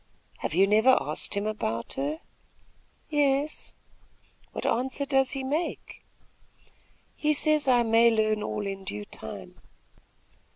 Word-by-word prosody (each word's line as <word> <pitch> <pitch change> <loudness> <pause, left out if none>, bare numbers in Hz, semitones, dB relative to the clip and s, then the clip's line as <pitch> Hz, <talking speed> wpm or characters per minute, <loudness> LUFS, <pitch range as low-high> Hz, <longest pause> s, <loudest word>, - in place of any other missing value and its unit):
"Have - - -3
you 190 +2 +6
never 220 +6 +5
asked - - -2
him 200 +1 -1
about 115 - -3
her?" 150 +4 -3 0.9
"Yes." 290 0 0 0.8
"What - - -6
answer 260 +3 -1
does 270 -1 +2
he 270 -1 -3
make?" 300 +6 -3 1.1
"He 305 0 +1
says 305 -1 +2
I 245 -2 +5
may 230 +1 +5
learn 215 -1 +1
all 210 0 -3
in 195 -1 -5
due 105 - -5
time." - - -9
230 Hz, 125 wpm, -27 LUFS, 200-275 Hz, 1.1 s, you